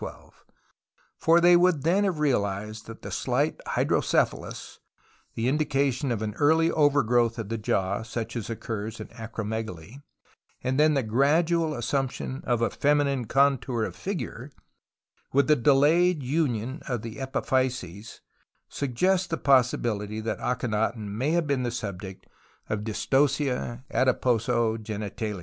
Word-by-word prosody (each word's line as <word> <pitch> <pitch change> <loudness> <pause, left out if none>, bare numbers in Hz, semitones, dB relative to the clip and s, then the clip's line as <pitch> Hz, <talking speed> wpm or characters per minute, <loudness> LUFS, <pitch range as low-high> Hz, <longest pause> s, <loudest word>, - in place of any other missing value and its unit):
For 165 +1 +5
they 175 +1 +6
would 175 -5 +3
then 185 +6 +3
have 185 -5 0
realized 105 -6 -1
that 115 - -10
the - - -6
slight - - 0
hydrocephalus, - - 0 0.6
the 115 +1 -1
indication 140 -2 0
of 110 -2 -2
an 105 -1 -3
early 160 +3 +4
overgrowth 125 -6 +2
of 110 -3 -5
the 115 - -2
jaw 100 -1 0
such 115 +1 -5
as 115 -2 -4
occurs 110 -1 -5
in - - -8
acromegaly, 110 - -6 0.6
and 130 +2 0
then 155 0 +4
the 135 - +1
gradual 155 +7 +2
assumption 130 +2 -2
of 120 -2 +1
a - - +1
feminine 140 -3 +1
contour 130 -2 +2
of - - -4
figure, 165 - -5 0.8
with 140 0 +3
a - - +7
delayed 150 +5 +3
union 130 -1 -1
of 125 -5 -3
the 115 -1 -7
epiphyses, 125 -7 -2 0.5
suggest 180 +8 0
the 165 - -1
possibility 120 -6 +1
tliat 110 +1 -3
Akhenaton 110 -3 -1
may 120 +8 -1
have 170 -1 +2
been 140 -3 0
tlie 120 -2 -2
subject 100 -4 -6 0.4
of 105 -1 -2
Dystocia 130 +1 0
adiposo 125 -3 +1
o;enitalis. 110 -3 -2
125 Hz, 130 wpm, -26 LUFS, 110-145 Hz, 0.8 s, a